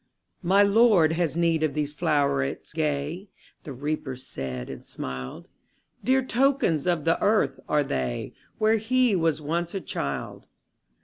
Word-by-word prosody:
``My 195 +3 +5
Lord 200 -6 +5
has 165 -1 -1
need 165 -2 +2
of 155 -2 0
these 150 -1 -2
flowerets 145 - 0
gay,'' 155 +4 -2 0.4
The 150 - -6
Reaper 145 0 -3
said, 65 - -6
and - - -8
smiled; 65 0 -7 0.6
``Dear 260 0 +2
tokens 250 - +2
of 170 -4 +1
the 165 - +2
earth 200 -11 +2
are 150 -1 +3
they, 65 - -3 0.2
Where 220 +1 +3
he 240 0 +2
was 160 -3 0
once 170 +4 -2
a - - 0
child. 70 - -5
160 Hz, 140 wpm, -26 LUFS, 140-200 Hz, 0.6 s, ``My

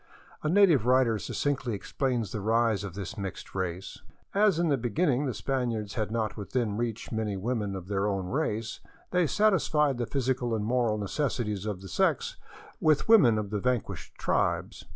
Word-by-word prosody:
A 155 - -1
native 170 - +5
writer 125 -4 +4
succinctly 135 -1 -2
explains 120 +1 -2
the 105 - -3
rise 110 -1 +2
of 95 -3 -6
this 100 +1 -6
mixed 95 -2 -6
race: 95 -1 -4 0.2
" - - -38
As 205 -3 +4
in 170 -1 +1
the 140 - +4
beginning 135 - 0
the 130 - -1
Spaniards 120 -6 -2
had 110 -2 -2
not 110 -1 -1
within 105 +1 -2
reach 115 0 -3
many 110 -3 -2
women 105 -1 -2
of 95 -2 -7
their 100 0 0
own 95 -2 -1
race, 115 -2 -2 0.3
they 180 -2 +3
satisfied 150 - +2
the 120 - -1
physical 125 -3 0
and 105 -1 -2
moral 120 -2 +1
necessities 105 -2 -2
of 100 -3 -3
the 95 - -9
sex - - 0 0.4
with 155 -2 +3
women 140 - +6
of 105 -1 -3
the 105 - -1
vanquished 125 -1 -2
tribes. - - -1
115 Hz, 175 wpm, -28 LUFS, 105-135 Hz, 0.4 s, women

